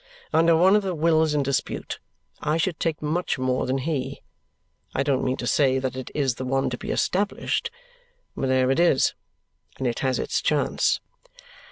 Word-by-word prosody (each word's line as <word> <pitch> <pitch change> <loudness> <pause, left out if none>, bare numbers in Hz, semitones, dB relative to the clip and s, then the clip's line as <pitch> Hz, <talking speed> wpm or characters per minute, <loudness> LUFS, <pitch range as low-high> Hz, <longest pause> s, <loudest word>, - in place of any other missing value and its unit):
Under 165 0 +5
one 185 +4 +5
of 210 - +4
the 190 -3 -3
wills 160 -1 +2
in 145 - +2
dispute, 135 0 -2 0.4
I 150 +2 +1
should 165 0 -1
take 160 -2 -1
much 160 +3 -1
more 130 0 0
than 130 +1 0
he. 135 -1 -3 0.7
I 135 - +2
don't 135 -2 +1
mean 130 0 0
to - - -4
say 135 -3 +3
that 130 -1 -2
it 130 -1 -6
is 135 -4 +1
the - - -2
one 135 0 0
to 125 - -3
be - - -7
established, 200 +3 0 0.7
but 135 - -1
there 130 0 +3
it 135 - +1
is, 170 -6 +4 0.6
and 130 - -3
it 120 -2 -1
has 130 -2 0
its - - -1
chance." - - +1
140 Hz, 185 wpm, -25 LUFS, 130-165 Hz, 0.7 s, Under